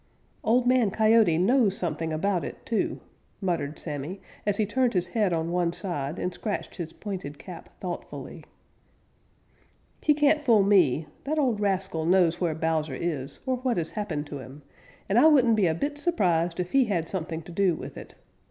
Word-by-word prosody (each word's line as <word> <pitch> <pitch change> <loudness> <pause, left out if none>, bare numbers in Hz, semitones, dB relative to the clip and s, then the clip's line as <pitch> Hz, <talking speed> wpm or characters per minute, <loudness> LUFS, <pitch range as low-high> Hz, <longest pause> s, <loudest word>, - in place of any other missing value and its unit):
"Old 245 +3 +3
Man 250 -4 +4
Coyote 215 -4 +4
knows 205 +2 +3
something 165 -2 -2
about 180 +3 0
it, - - -8
too," 225 - -1 0.4
muttered 170 -6 -2
Sammy, 150 +5 -5 0.3
as 205 -1 +1
he 215 - +2
turned 245 +2 +1
his 180 -1 0
head 210 -2 +1
on 165 0 -1
one 175 -1 +1
side 170 -5 -4
and 180 - -2
scratched 210 -2 -4
his 165 -3 -5
pointed 185 -9 -6
cap 170 +5 -10
thoughtfully. 180 -2 -7 1.6
"He 300 - +3
can't 295 +1 +3
fool 225 -7 +5
me. 175 -7 +4 0.2
That 305 +3 -1
old 250 -8 +1
rascal 190 -5 0
knows 175 -2 +3
where 165 -3 0
Bowser 160 -3 -1
is, 145 -4 -3
or 260 -1 0
what 250 -2 -1
has 165 -2 -1
happened 170 -9 -3
to 145 -1 -7
him, 135 +3 -11 0.4
and 205 +4 +3
I 310 - +7
wouldn't 255 -7 +5
be 205 -4 +3
a 160 - +1
bit 290 - -3
surprised 175 - +1
if 180 0 -2
he 270 -2 +4
had 175 -7 -1
something 165 -3 -4
to 175 - -11
do 180 -1 +2
with - - -8
it. - - -11
185 Hz, 180 wpm, -27 LUFS, 165-220 Hz, 1.6 s, I